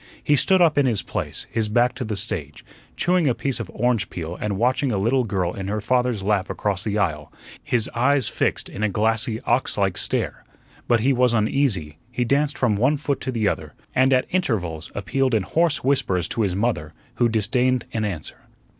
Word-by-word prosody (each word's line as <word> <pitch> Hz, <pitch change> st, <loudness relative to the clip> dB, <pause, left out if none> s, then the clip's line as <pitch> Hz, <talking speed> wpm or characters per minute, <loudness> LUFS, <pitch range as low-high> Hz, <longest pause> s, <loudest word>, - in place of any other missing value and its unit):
He 150 Hz, -, +3 dB
stood 185 Hz, +6 st, +4 dB
up 150 Hz, -4 st, +3 dB
in 140 Hz, -, +3 dB
his 110 Hz, -5 st, 0 dB
place, -, -, -4 dB
his 110 Hz, -2 st, 0 dB
back 120 Hz, +3 st, +3 dB
to 125 Hz, -, -5 dB
the 110 Hz, -3 st, -3 dB
stage, 85 Hz, -8 st, -4 dB, 0.3 s
chewing 175 Hz, -4 st, +2 dB
a 120 Hz, -, +1 dB
piece 135 Hz, -3 st, -2 dB
of 115 Hz, -, -5 dB
orange 120 Hz, -2 st, 0 dB
peel 85 Hz, 0 st, -5 dB
and 105 Hz, -2 st, -1 dB
watching 125 Hz, +4 st, +1 dB
a 105 Hz, -, 0 dB
little 120 Hz, +7 st, +2 dB
girl 95 Hz, -4 st, -1 dB
in 95 Hz, -1 st, -5 dB
her 105 Hz, +2 st, -1 dB
father's 125 Hz, -1 st, 0 dB
lap 100 Hz, -1 st, +1 dB
across 100 Hz, -2 st, -1 dB
the 105 Hz, -1 st, -1 dB
aisle, 75 Hz, -7 st, -1 dB, 0.3 s
his 115 Hz, -3 st, +1 dB
eyes 130 Hz, 0 st, +2 dB
fixed -, -, -1 dB
in 105 Hz, -, -7 dB
a 105 Hz, -, +2 dB
glassy, 110 Hz, +2 st, 0 dB
ox 120 Hz, +2 st, 0 dB
like 95 Hz, -3 st, +1 dB
stare. -, -, -1 dB, 0.4 s
But 120 Hz, -2 st, +3 dB
he 135 Hz, +4 st, +3 dB
was 125 Hz, -1 st, +3 dB
uneasy. 105 Hz, -, 0 dB
He 125 Hz, 0 st, -1 dB
danced 140 Hz, +4 st, +1 dB
from 110 Hz, -5 st, +1 dB
one 130 Hz, +7 st, +2 dB
foot 140 Hz, -1 st, -2 dB
to 130 Hz, -, -3 dB
the 110 Hz, -4 st, 0 dB
other, -, -, -3 dB, 0.2 s
and 130 Hz, +1 st, +3 dB
at 130 Hz, -1 st, +3 dB
intervals 90 Hz, -, -1 dB
appealed 130 Hz, +4 st, 0 dB
in 105 Hz, -, +1 dB
hoarse 165 Hz, -, +1 dB
whispers 95 Hz, -10 st, +1 dB
to 115 Hz, -, -1 dB
his 95 Hz, -4 st, 0 dB
mother, 95 Hz, -8 st, -1 dB, 0.2 s
who 120 Hz, -1 st, +3 dB
disdained 125 Hz, +3 st, +1 dB
an 110 Hz, -, -1 dB
answer. 90 Hz, -7 st, -4 dB
115 Hz, 205 wpm, -23 LUFS, 100-130 Hz, 0.4 s, stood